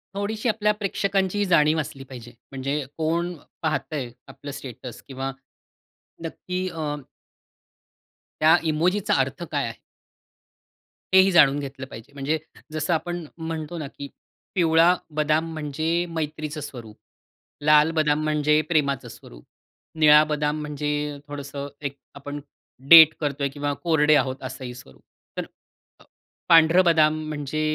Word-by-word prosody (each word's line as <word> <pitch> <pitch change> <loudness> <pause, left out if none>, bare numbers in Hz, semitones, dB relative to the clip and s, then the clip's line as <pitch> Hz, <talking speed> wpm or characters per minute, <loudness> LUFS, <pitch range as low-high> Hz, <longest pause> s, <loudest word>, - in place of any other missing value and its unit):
थोडीशी 215 +3 -2
आपल्या 210 -1 +1
प्रेक्षकांची 200 -1 -1
जाणीव 155 -3 +3
असली 135 -2 -6
पाहिजे. 120 -3 -11 0.2
म्हणजे 140 +1 -3
कोण 170 +2 -1 0.3
पाहतंय 155 -4 -2 0.2
आपलं 145 - -9
स्टेटस 130 -3 -9
किंवा 135 0 -4 0.9
नक्की 180 +3 -4
अ, 155 -3 -3 1.5
त्या 155 +1 +6 0.2
इमोजीचा 185 +7 +1
अर्थ 135 +5 -1
काय 145 -2 0
आहे? 115 - -8 1.3
हे 190 - +8
ही 190 +1 +3
जाणून 145 -5 +5
घेतलं 135 -1 -7
पाहिजे. 115 +3 -12
म्हणजे 140 +3 -1 0.4
जसं 155 +2 0
आपण 175 +1 -3
म्हणतो 160 0 -5
ना, 150 -4 -5
की 140 0 -9 0.5
पिवळा 165 0 +4 0.2
बदाम 155 +2 +1
म्हणजे 160 +3 -1
मैत्रीचं 155 -1 -4
स्वरूप, 115 -6 -9 0.7
लाल 150 +1 +5
बदाम 155 -1 +2
म्हणजे 150 0 +2
प्रेमाचं 140 -5 +1
स्वरूप, - - -14 0.5
निळा 150 0 +7
बदाम 150 0 -1
म्हणजे 150 0 -3
थोडंसं 140 -1 -6
एक 140 -1 -5 0.2
आपण 145 +1 -7 0.5
डेट 160 -2 +10
करतोय 140 -2 -1
किंवा 145 +1 -3
कोरडे 155 -3 +4
आहोत 130 -2 0
असंही 130 -1 -6
स्वरूप. 125 - -15 1.0
अ, - - -19 0.5
पांढरं 165 +2 +6
बदाम 155 -2 +4
म्हणजे 150 0 -3
150 Hz, 125 wpm, -24 LUFS, 140-165 Hz, 1.5 s, डेट